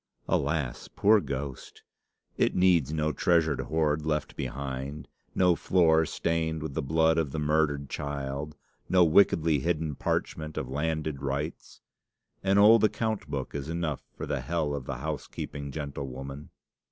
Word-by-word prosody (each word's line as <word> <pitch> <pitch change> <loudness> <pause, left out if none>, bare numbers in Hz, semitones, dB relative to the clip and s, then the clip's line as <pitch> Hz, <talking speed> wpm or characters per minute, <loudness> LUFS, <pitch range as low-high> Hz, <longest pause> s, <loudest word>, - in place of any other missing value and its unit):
'Alas, 70 -4 -1
poor 105 +2 +4
ghost!' 70 -3 -6 0.5
It - - +1
needs 90 -6 +4
no 75 0 0
treasured 85 -5 +2
hoard 80 -1 0
left 75 -1 -2
behind, 70 +2 -5 0.3
no 90 -2 +4
floor 80 -4 +3
stained 80 -2 -1
with 80 -3 -5
the - - -1
blood 80 +3 +3
of 75 -4 -1
the 80 - -4
murdered 75 -2 +1
child, 70 +1 -4 0.3
no 90 -1 +6
wickedly 80 -3 +4
hidden 80 +1 -1
parchment 75 +3 -2
of 65 - -2
landed 75 +1 -2
rights! 70 +3 -4 0.6
An 95 +1 +3
old 105 +2 +7
account 110 0 0
book - - -4
is 70 +1 -4
enough 80 -4 -2 0.2
for - - -4
the - - -2
hell 80 -3 -1
of 70 -3 -4
the 70 -1 -4
housekeeping 70 0 -5
gentlewoman! 70 -1 -6
75 Hz, 140 wpm, -28 LUFS, 70-80 Hz, 0.6 s, old